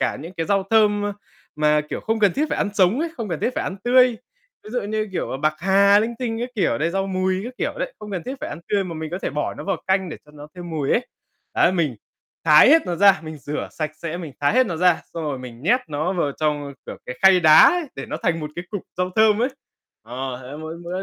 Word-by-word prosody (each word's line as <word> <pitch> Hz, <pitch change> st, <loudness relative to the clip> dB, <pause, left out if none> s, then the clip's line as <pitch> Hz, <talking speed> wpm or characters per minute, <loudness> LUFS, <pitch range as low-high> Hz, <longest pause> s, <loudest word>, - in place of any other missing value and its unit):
cả -, -, 0 dB
những 165 Hz, +5 st, -9 dB
cái 165 Hz, -, -2 dB
rau 200 Hz, -1 st, +2 dB
thơm, 210 Hz, -2 st, +3 dB
a, 205 Hz, -, -2 dB, 0.4 s
mà, 150 Hz, 0 st, +3 dB
kiểu, -, -, -3 dB
không 225 Hz, 0 st, -1 dB
cần 200 Hz, -4 st, +4 dB
thiết 300 Hz, +3 st, 0 dB
phải -, -, -2 dB
ăn -, -, 0 dB
sống 200 Hz, +6 st, +3 dB
ấy, 335 Hz, -, -1 dB
không 225 Hz, -3 st, -4 dB
cần 170 Hz, -4 st, -3 dB
thiết -, -, +1 dB
phải -, -, -2 dB
ăn 190 Hz, -, -4 dB
tươi. 250 Hz, +1 st, +6 dB, 0.6 s
Ví 215 Hz, -, -10 dB
dụ, 245 Hz, 0 st, -2 dB
như 215 Hz, +1 st, -2 dB
kiểu, 175 Hz, -, -3 dB
bạc 155 Hz, 0 st, +2 dB
hà 200 Hz, +3 st, +5 dB
linh 225 Hz, +3 st, -1 dB
tinh 230 Hz, -3 st, -3 dB
các 245 Hz, -, -2 dB
kiểu 195 Hz, -, +1 dB
đấy, 160 Hz, +3 st, 0 dB
rau 195 Hz, +2 st, -1 dB
mùi 185 Hz, 0 st, 0 dB
các 250 Hz, -, -7 dB
kiểu -, -, -1 dB
đấy, -, -, -3 dB
không 210 Hz, -1 st, -9 dB
cần 185 Hz, -4 st, -3 dB
thiết 260 Hz, -, -4 dB
phải -, -, -4 dB
ăn -, -, -7 dB
tươi 200 Hz, -2 st, +1 dB
mà 170 Hz, -3 st, -6 dB
mình 160 Hz, 0 st, -5 dB
có 180 Hz, -, -3 dB
thể -, -, -1 dB
bỏ 150 Hz, +2 st, -2 dB
nó -, -, -8 dB
vào 195 Hz, -, -1 dB
canh 190 Hz, -1 st, +1 dB
để 160 Hz, -, -6 dB
cho 150 Hz, -, -19 dB
nó 150 Hz, 0 st, -11 dB
thêm 175 Hz, -1 st, -8 dB
mùi 150 Hz, -4 st, -2 dB
ấy. 245 Hz, -, +1 dB, 0.5 s
Đấy, 175 Hz, -, +4 dB
mình 155 Hz, -9 st, 0 dB, 0.5 s
thái 150 Hz, +5 st, +7 dB
hết 320 Hz, +3 st, +6 dB
nó 175 Hz, -, -2 dB
ra, 195 Hz, -2 st, +5 dB
mình 155 Hz, -1 st, -7 dB
rửa 145 Hz, +2 st, -5 dB
sạch 155 Hz, -1 st, -3 dB
sẽ, 170 Hz, 0 st, -3 dB
mình 165 Hz, -5 st, -7 dB
thái 145 Hz, -, +2 dB
hết 255 Hz, 0 st, +4 dB
nó 170 Hz, -5 st, -3 dB
ra, 180 Hz, 0 st, +3 dB
xong 165 Hz, -, -4 dB
rồi 145 Hz, -3 st, -3 dB
mình 125 Hz, -1 st, -10 dB
nhét 240 Hz, -, +3 dB
nó 155 Hz, +4 st, -1 dB
vào 170 Hz, -6 st, -1 dB
trong, 145 Hz, -2 st, -2 dB
kiểu, -, -, -7 dB
cái 125 Hz, -, -7 dB
khay 190 Hz, -1 st, +7 dB
đá 155 Hz, -2 st, +8 dB
ấy 355 Hz, 0 st, +5 dB
để 135 Hz, -, -7 dB
nó 150 Hz, -, -4 dB
thành 165 Hz, -1 st, 0 dB
một 150 Hz, -1 st, -5 dB
cái 175 Hz, -, -5 dB
cục 205 Hz, -3 st, -4 dB
rau 180 Hz, 0 st, -1 dB
thơm 215 Hz, -1 st, +5 dB
ấy. 250 Hz, -, +2 dB, 0.5 s
Ờ, 125 Hz, +2 st, -5 dB
thế 130 Hz, +3 st, -9 dB
mỗi 160 Hz, +1 st, -7 dB
bữa 180 Hz, +2 st, -4 dB
180 Hz, 275 wpm, -22 LUFS, 155-205 Hz, 0.6 s, đá